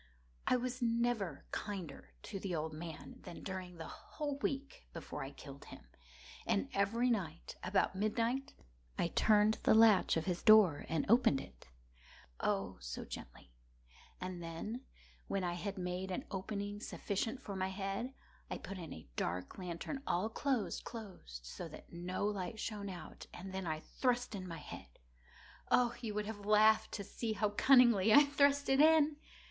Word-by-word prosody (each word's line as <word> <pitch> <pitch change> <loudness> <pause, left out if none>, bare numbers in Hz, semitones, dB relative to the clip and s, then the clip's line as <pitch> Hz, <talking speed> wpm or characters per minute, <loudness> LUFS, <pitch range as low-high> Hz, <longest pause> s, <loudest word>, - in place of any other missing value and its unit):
I - - +5
was 250 +1 -2
never 230 - 0
kinder 190 -9 -5
to 195 - -5
the 185 -2 -3
old 155 0 -2
man 155 -3 -8
than - - -9
during 185 -2 -5
the 160 -1 -6
whole 290 -2 -5
week 275 0 -3
before 165 - -5
I 135 - -5
killed 140 0 -11
him. - - -12 0.6
And 95 -2 +1
every 230 +5 +2
night, 170 -7 -3
about 190 +1 +2
midnight, 230 +6 0 0.4
I 170 - +1
turned 215 +2 +4
the - - +5
latch 220 -6 +6
of 160 - -1
his 180 -2 -1
door 210 -9 +6
and 160 -2 0
opened 230 - +5
it—oh, - - -6
so - - -6
gently! - - -9 0.7
And 185 -1 -5
then, 210 +10 -5 0.4
when 195 -1 -1
I 175 -1 0
had 195 +4 -4
made 180 +1 -3
an 225 +10 -3
opening 200 +1 -3
sufficient 225 +4 -2
for 200 - -5
my 190 0 -1
head, 195 +5 -3 0.4
I - - -3
put 195 -1 -7
in 165 -4 -7
a 80 -3 -9
dark 90 - -3
lantern, 180 - -4
all 180 +5 +1
closed, 245 -4 -1
closed, 180 - -8
that - - -8
no 180 +3 -2
light 205 0 -2
shone 205 -2 -3
out, 175 -4 -9
and 190 +2 -8
then 190 -2 -3
I 155 -1 -2
thrust 245 +2 0
in 185 -2 -5
my 165 -2 -5
head. - - -10 0.7
Oh, 240 -1 +4
you 220 -3 -4
would 210 0 -1
have 205 -1 -6
laughed 215 +1 +5
to 200 - -3
see 220 +3 -3
how 210 0 +1
cunningly 235 -4 +6
I 290 +6 +10
thrust 285 0 +3
it 270 0 +3
in! 310 -1 +6
200 Hz, 165 wpm, -36 LUFS, 175-230 Hz, 0.7 s, I